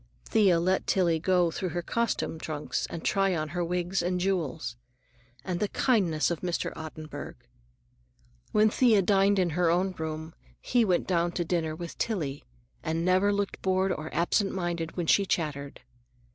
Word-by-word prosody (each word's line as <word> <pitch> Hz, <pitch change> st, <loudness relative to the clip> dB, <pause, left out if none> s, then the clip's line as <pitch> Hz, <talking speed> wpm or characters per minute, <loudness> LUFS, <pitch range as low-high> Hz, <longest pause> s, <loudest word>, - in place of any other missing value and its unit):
Thea 195 Hz, -7 st, +4 dB
let 185 Hz, +3 st, +1 dB
Tillie 170 Hz, -4 st, +2 dB
go 180 Hz, 0 st, +2 dB
through 185 Hz, +2 st, -3 dB
her 175 Hz, 0 st, -3 dB
costume 230 Hz, -6 st, -1 dB
trunks 150 Hz, -2 st, -3 dB
and 165 Hz, -, -6 dB
try 195 Hz, -2 st, +2 dB
on 155 Hz, -1 st, -2 dB
her 175 Hz, +3 st, -2 dB
wigs 180 Hz, +2 st, -1 dB
and 180 Hz, +1 st, -1 dB
jewels. 165 Hz, -9 st, -1 dB, 0.7 s
And 180 Hz, -1 st, -2 dB
the 210 Hz, -, +1 dB
kindness 185 Hz, -, +1 dB
of 170 Hz, -, -2 dB
Mr. 175 Hz, -2 st, -2 dB
Ottenburg! 155 Hz, -1 st, -7 dB, 1.2 s
When 215 Hz, 0 st, +4 dB
Thea 220 Hz, -6 st, +4 dB
dined 200 Hz, +1 st, +3 dB
in 180 Hz, -3 st, +2 dB
her 175 Hz, +1 st, +2 dB
own 180 Hz, +3 st, +2 dB
room, 160 Hz, -1 st, -5 dB, 0.3 s
he 245 Hz, -1 st, +2 dB
went 185 Hz, -5 st, +1 dB
down 175 Hz, -1 st, +1 dB
to 175 Hz, -, -1 dB
dinner 160 Hz, -2 st, -1 dB
with 170 Hz, +1 st, -8 dB
Tillie, 155 Hz, -11 st, -2 dB, 0.4 s
and 165 Hz, +2 st, -1 dB
never 185 Hz, +3 st, +3 dB
looked 200 Hz, -1 st, -2 dB
bored 190 Hz, 0 st, +1 dB
or 155 Hz, -2 st, -4 dB
absent 175 Hz, +5 st, +1 dB
minded 170 Hz, -2 st, -3 dB
when 175 Hz, -, -1 dB
she 200 Hz, -, +4 dB
chattered. 145 Hz, -5 st, -2 dB
175 Hz, 165 wpm, -28 LUFS, 160-190 Hz, 1.2 s, Thea